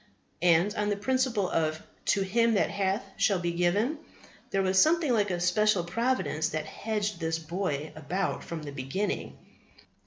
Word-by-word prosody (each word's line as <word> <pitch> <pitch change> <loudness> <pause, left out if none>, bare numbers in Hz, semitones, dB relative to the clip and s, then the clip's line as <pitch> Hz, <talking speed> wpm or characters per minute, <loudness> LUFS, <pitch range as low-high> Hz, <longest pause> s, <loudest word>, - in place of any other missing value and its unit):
And, 175 +3 +4
on 210 -2 -1
the 205 - +1
principle 240 -2 0
of 155 -2 0 0.3
"to 200 - +2
him 230 +4 +2
that - - +2
hath 195 0 0
shall 200 - +3
be 175 -1 -1
given," 200 - +1 0.5
there 195 0 +1
was 190 0 +4
something 315 -4 +3
like 205 -3 +2
a 175 -1 -1
special 180 +2 +2
providence 175 -5 0
that 155 0 -3
hedged 210 -3 -3
this 160 -1 -1
boy 160 -3 -3
about 175 +6 -2
from 165 -2 -6
the 145 - -6
beginning. 140 +10 -3
190 Hz, 160 wpm, -28 LUFS, 170-210 Hz, 0.5 s, And